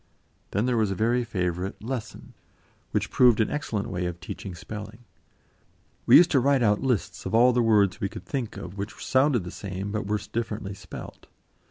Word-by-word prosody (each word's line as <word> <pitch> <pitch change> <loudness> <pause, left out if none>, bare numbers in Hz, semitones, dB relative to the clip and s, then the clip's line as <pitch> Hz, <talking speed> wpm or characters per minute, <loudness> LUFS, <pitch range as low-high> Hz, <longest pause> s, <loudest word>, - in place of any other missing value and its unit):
Then 100 +4 0
there 125 -2 +1
was 110 -3 +2
a 95 - -2
very 120 +5 +1
favourite 90 -4 -3
"lesson," 125 -1 -6 0.6
which - - -1
proved 120 -3 +5
an 110 - +1
excellent 115 -8 -2
way 90 -1 -2
of 85 -1 -5
teaching 90 +2 -7
spelling. 105 +5 -9 1.0
We - - +10
used 175 0 +6
to 140 - +4
write 135 0 +3
out 105 -2 +3
lists 125 -7 -1
of - - -1
all 125 +2 +6
the 120 - +3
words 105 -3 +3
we 100 - 0
could - - -9
think 125 -7 -4
of 95 0 -8
which 100 +2 -4
sounded 130 -4 +3
the 90 - -7
same 95 0 -5
but 105 -1 -3
were 105 +1 +1
differently 105 -1 -4
spelt. 95 - -10
105 Hz, 190 wpm, -26 LUFS, 100-120 Hz, 1.0 s, We